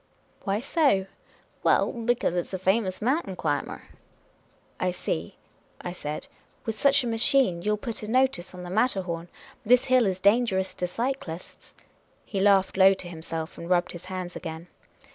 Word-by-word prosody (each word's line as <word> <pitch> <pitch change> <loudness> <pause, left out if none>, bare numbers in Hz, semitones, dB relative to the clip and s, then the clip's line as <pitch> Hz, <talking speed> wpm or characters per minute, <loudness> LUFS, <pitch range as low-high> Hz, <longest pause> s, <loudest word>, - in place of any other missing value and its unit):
"Why 200 0 +1
so?" 275 - +2 0.3
" - - -34
Well, - - +3
because 235 -5 0
it 175 - -1
's - - -5
a - - -1
famous 190 +1 0
mountain 255 - 0
climber." - - -2 0.5
" - - -36
I 185 - +1
see," 85 - -3 0.4
I 175 - -5
said. 150 -4 -5 0.2
" - - -36
With 225 - -1
such 280 +4 +3
a - - -2
machine 225 -3 +3
you 210 +3 +1
'11 - - 0
put 225 +2 -5
a 210 - -6
notice 245 -7 +1
on 180 - -8
the 175 - -7
Matterhorn, 185 -6 0 0.2
' - - -25
This 245 +2 +4
hill 250 -4 +5
is 185 -1 0
dangerous 195 -1 +2
to 180 - -2
cyclists.' 230 -5 -5 0.2
" - - -37
He 200 - -3
laughed 195 -1 +4
low 195 0 +7
to 185 - -6
himself, 160 -1 -5
and 170 - -7
rubbed 175 -1 +2
his 175 0 -9
hands 185 -1 -5
again. 165 +1 -7
190 Hz, 185 wpm, -26 LUFS, 180-235 Hz, 0.5 s, low